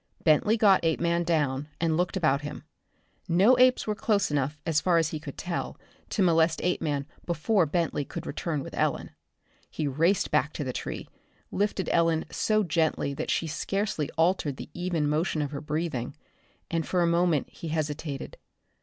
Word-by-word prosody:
Bentley 180 +8 +4
got 200 -5 +5
Apeman 170 +1 +1
down, 145 -4 0
and 165 -1 +1
looked 180 +3 0
about 145 -6 +2
him. 150 0 -7 0.6
No 190 +9 +5
apes 255 0 +5
were 215 - 0
close 205 -4 +1
enough, 145 +1 0
as 155 -2 +2
far 175 -2 +3
as 165 -1 +2
he 155 - -4
could 145 -2 -9
tell, 175 -1 -4 0.3
to 200 - +1
molest 165 -2 +3
Apeman 150 -5 0 0.2
before 175 +2 +2
Bentley 160 -1 0
could - - -7
return 150 -1 -3
with - - -9
Ellen. - - -1 0.6
He 155 - -2
raced 165 +8 +1
back 135 - +3
into 150 - -2
the 130 -2 -3
tree, - - -5 0.4
lifted 200 -1 -1
Ellen 165 -1 +2
so 215 -1 +1
gently 160 -4 0
that - - -4
she - - +1
scarcely 165 0 -2
altered 160 -4 +1
the - - -9
even 175 -4 -1
motion 155 +2 0
of 145 -1 -2
her 140 - -5
breathing 150 -5 -3 0.6
and 165 -1 0
for 180 -2 +2
a - - +3
moment 170 -3 +2
he 170 - -8
hesitated. 150 -2 -3
165 Hz, 170 wpm, -27 LUFS, 150-180 Hz, 0.6 s, got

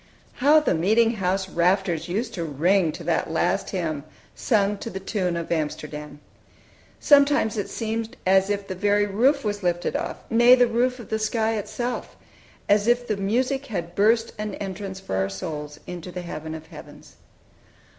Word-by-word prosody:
How 290 +4 +6
the 305 - +1
meeting 220 +7 +2
house 190 0 0
rafters 180 -1 +1
used 220 +6 -2
to 170 - -3
ring 165 +4 +2
to 170 - -8
that 165 -1 0
last 160 - 0
hymn, 160 -6 -3 0.3
sung 205 -3 +1
to 230 - -5
the 190 - -6
tune 185 -3 -2
of 170 0 -5
"Amsterdam!" 150 -2 -4 0.8
Sometimes 285 -6 +4
it 205 - -3
seemed 225 0 -4
as 190 +1 +4
if 200 -1 -2
the 190 - -3
very 205 +2 +2
roof 255 +8 +2
was 205 -1 -2
lifted 175 -1 -1
off, - - -3
nay, 240 +2 +6
the 250 -1 +5
roof 245 +2 0
of 235 - -11
the 220 - -1
sky 220 +1 0
itself 240 +4 -4 0.5
as 205 +1 +3
if 240 0 +2
the 215 - 0
music 255 +7 0
had 175 -7 -4
burst 225 +4 +2
an 210 0 -3
entrance 195 -1 -6
for 190 - -5
our 95 +1 0
souls 150 +9 -6
into 180 0 -7
the 180 0 -6
heaven 160 -1 -6
of 160 - -9
heavens. - - -13
200 Hz, 175 wpm, -24 LUFS, 175-225 Hz, 0.8 s, How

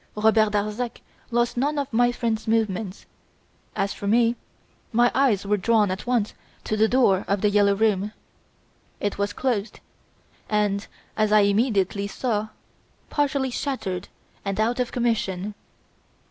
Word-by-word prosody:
Robert 215 0 +3
Darzac 210 +4 -2 0.3
lost 240 0 0
none 290 +4 0
of 280 -4 -3
my 245 +1 +4
friend's 230 -2 -2
movements. 220 -3 -1 0.7
As 195 0 0
for 200 - -6
me, 230 +2 +3 0.6
my 240 +1 +4
eyes 240 -8 +2
were 205 +1 +2
drawn 210 0 +2
at 190 +5 -5
once 240 -4 +1 0.3
to 215 - -1
the 215 +1 +4
door 220 -6 +3
of 200 -1 0
"The 210 - +3
Yellow 200 -1 +4
Room". 210 -1 +1 0.9
It 205 -1 -2
was 200 0 0
closed 225 -5 -2 0.7
and, 205 -1 0 0.3
as 215 -1 +1
I 215 0 +6
immediately 200 -1 +1
saw, 215 0 -2 0.6
partially 280 -3 0
shattered 200 -10 -3 0.4
and 195 0 -3
out 235 +3 +1
of 250 - -1
commission. 210 -5 -1
215 Hz, 140 wpm, -24 LUFS, 200-240 Hz, 0.9 s, I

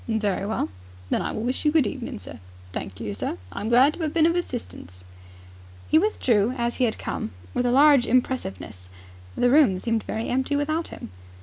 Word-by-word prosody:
"Very 210 -3 -1
well." 215 - -1 0.4
"Then - - +2
I - - -2
will 220 - -4
wish 250 +2 -2
you 300 - +3
good 305 -4 +4
evening, 240 +2 -5
sir. 205 - -9 0.3
Thank 95 +1 -6
you, 105 -3 -4
sir. 95 -2 -3
I - - -6
am 220 - -2
glad 255 +5 +5
to 335 - -5
'ave 310 - -1
been 325 -2 +4
of 335 - +3
assistance." 225 - -5 0.9
He 315 - +6
withdrew 250 - +1
as 235 0 -1
he 255 - +3
had 220 - -1
come, - - -4 0.2
with 245 - 0
a - - +2
large 275 -1 +6
impressiveness. 110 - -2 0.5
The 245 - +2
room 270 -10 +5
seemed 225 +3 -1
very 220 +2 -4
empty 265 +3 0
without 310 +3 -1
him. - - -10
245 Hz, 200 wpm, -24 LUFS, 205-285 Hz, 0.9 s, He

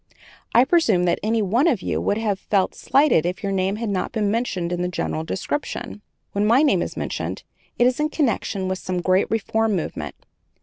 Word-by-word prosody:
I 245 - +7
presume 260 - +3
that 175 - +1
any 220 0 +1
one 235 - +2
of 250 - +1
you - - -1
would 205 - 0
have 210 -3 -1
felt 195 -3 0
slighted 275 - +3
if 180 +5 -3
your 200 - -1
name 190 +1 0
had 225 0 -3
not 190 -2 -2
been 210 -3 0
mentioned 195 -7 -1
in 175 - -2
the 180 - 0
general 80 - -3
description. 95 +2 -4 0.3
When 205 +1 0
my 245 +6 +5
name 295 - +3
is - - -4
mentioned, - - -4 0.3
it 240 - +4
is 250 +2 +2
in 300 0 +1
connection 230 - -1
with 185 0 -2
some 180 -1 -3
great 185 +1 +2
reform 225 -1 0
movement. 170 - -4
205 Hz, 205 wpm, -22 LUFS, 185-230 Hz, 0.3 s, I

